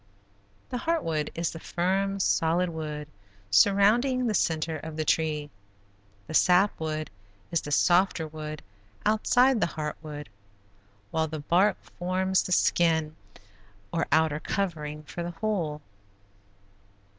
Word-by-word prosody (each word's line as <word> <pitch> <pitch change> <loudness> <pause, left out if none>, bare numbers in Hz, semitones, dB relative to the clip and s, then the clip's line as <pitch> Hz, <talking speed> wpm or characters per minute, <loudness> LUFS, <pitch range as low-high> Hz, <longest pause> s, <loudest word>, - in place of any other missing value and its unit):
The 250 - -2
heart 330 +3 0
wood 155 -2 -1
is 170 0 -1
the 165 - -8
firm, 195 +4 -1
solid 175 -1 +2
wood 150 -2 -5 0.4
surrounding 215 - +4
the 225 - +1
center 160 -3 0
of 155 +1 -8
the 155 - -1
tree, 150 -2 0 0.7
the 155 - -8
sap 180 +5 +4
wood 155 -1 -3 0.4
is 170 - +1
the 145 - -7
softer 175 +1 +3
wood 155 0 -7 0.4
outside 245 +3 +3
the - - +3
heart 150 -1 -3
wood, 150 -2 -7 0.8
while 160 0 0
the 155 -1 -5
bark 180 +7 +3 0.2
forms 185 +1 +1
the - - -6
skin 160 -3 +2 0.8
or 165 - 0
outer 160 -1 +3
covering 155 -6 -3
for 160 +3 -7
the 170 - -3
whole. 170 -9 -1
165 Hz, 130 wpm, -27 LUFS, 155-195 Hz, 0.8 s, surrounding